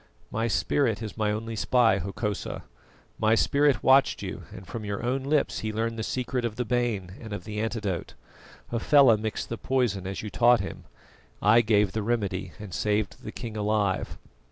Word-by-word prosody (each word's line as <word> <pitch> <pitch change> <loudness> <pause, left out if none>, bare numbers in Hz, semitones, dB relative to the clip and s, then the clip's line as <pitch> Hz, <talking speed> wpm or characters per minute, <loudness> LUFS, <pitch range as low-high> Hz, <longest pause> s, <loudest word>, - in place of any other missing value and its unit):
"My 115 +1 0
spirit 115 +1 +1
is 110 - -6
my 110 -1 0
only 115 +2 -3
spy, 115 -3 +3
Hokosa. 100 +3 -4 0.6
My 110 +1 +4
spirit 140 +3 +3
watched 135 +1 +4
you, - - -6
and 95 - -10
from 110 +4 -6
your 100 +1 -4
own 130 +2 0
lips 145 +2 +1
he 110 - -3
learned 115 +1 -2
the - - -1
secret 125 +2 -2
of 115 -2 -2
the 125 - -2
bane 115 -6 -1
and 110 -2 -8
of 100 - -5
the 105 +1 -5
antidote. 105 -5 -3 0.6
Hafela 120 +1 +5
mixed 110 0 -4
the 115 - -4
poison 115 -8 0
as 95 +2 -5
you 105 - -5
taught 120 -1 +5
him; - - -6 0.5
I 110 +3 +5
gave 105 -3 +3
the 110 - -2
remedy, 100 -5 -1
and 105 -4 -9
saved 105 0 -1
the - - -6
king 115 -2 -7
alive." 105 -2 0
110 Hz, 180 wpm, -27 LUFS, 105-120 Hz, 0.6 s, Hafela